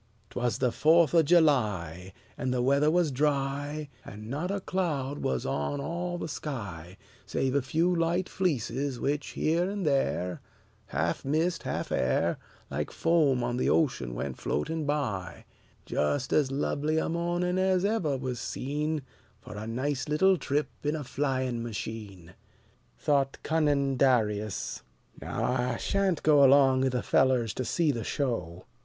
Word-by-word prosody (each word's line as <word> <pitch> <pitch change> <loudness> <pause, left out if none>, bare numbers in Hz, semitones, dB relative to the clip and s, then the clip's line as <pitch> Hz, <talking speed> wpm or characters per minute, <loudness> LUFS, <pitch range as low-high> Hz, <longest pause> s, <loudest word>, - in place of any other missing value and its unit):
'T - - -4
was 120 -1 0
the 125 -2 +1
Fourth 160 +3 +4
of 165 -2 +5
July, 105 - +2 0.2
And 130 - -2
the 125 -1 0
weather 140 +3 +3
was 170 -2 +2
dry, 145 +2 -1 0.2
And 105 +3 -9
not 155 +6 -2
a 200 +1 -1
cloud 150 -8 -2
was 65 -2 -1
on 75 - -2
all 175 +4 -3
the 175 - -4
sky, 100 - -6 0.3
Save 130 -1 0
a 140 - +2
few 165 +8 +1
light 170 +2 +1
fleeces, 140 - -1
which 145 +1 -1
here 170 +4 +1
and 200 -2 -3
there, 135 - 0 0.5
Half 85 +1 -1
mist, 160 +5 0
half - - -4
air, 65 +1 +1 0.3
Like - - -2
foam 150 -7 +2
on 120 0 -1
the - - +1
ocean 65 - +1
went 65 +1 -4
floating 155 - -2
by: 110 - -2 0.4
Just 125 - -1
as 140 -3 +3
lovely 150 +2 0
a - - +1
morning 175 +2 0
as 190 0 +2
ever 185 -10 0
was 130 -2 -4
seen 150 +2 -2 0.4
For 105 - -11
a 105 +1 -6
nice 135 +4 -2
little 190 +6 +4
trip 150 -3 -1
in 150 +1 0
a 150 - -4
flying 130 -2 -1
machine. 105 -6 -6 0.6
Thought 140 -2 +1
cunning 145 -4 +1
Darius: 110 -6 +1 0.4
"Now - - -3
I 125 -1 0
shan't 195 -4 0
go 150 -2 +6
Along 135 -1 +5
'ith 130 - +1
the 125 -1 -1
fellers 125 -5 +2
to 130 - -3
see 155 +6 +1
the 115 -4 -4
show. 95 - -3
140 Hz, 155 wpm, -28 LUFS, 120-160 Hz, 0.6 s, go